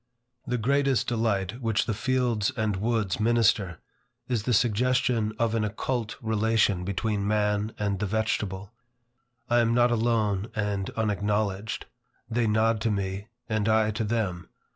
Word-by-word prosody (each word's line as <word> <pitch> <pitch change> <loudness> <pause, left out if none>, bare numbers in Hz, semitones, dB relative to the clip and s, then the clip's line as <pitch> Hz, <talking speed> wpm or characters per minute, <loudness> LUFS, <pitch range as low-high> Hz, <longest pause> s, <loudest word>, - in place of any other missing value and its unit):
The 125 0 0
greatest 135 +2 +2
delight 110 -1 -1
which 115 -3 +1
the 110 - -1
fields 125 -1 0
and 110 -3 0
woods 110 -2 0
minister, 110 -6 +2 0.5
is 120 -4 0
the 125 - -2
suggestion 120 +1 +2
of 115 -1 +1
an 115 -1 +1
occult 110 +2 -2
relation 110 -4 +2
between 100 +2 -1
man 105 0 0
and 100 -2 -1
the 105 - -1
vegetable. 100 -1 -2 0.7
I 120 0 +3
am 115 0 +2
not 120 0 +4
alone 110 -4 +1
and 100 -2 -1
unacknowledged. 105 -1 -1 0.4
They 115 0 0
nod 110 +1 +2
to 115 - +1
me, 100 0 -2 0.2
and 110 -1 0
I 110 -1 +3
to 110 +2 -2
them. 105 -6 -2
110 Hz, 140 wpm, -27 LUFS, 100-115 Hz, 0.7 s, not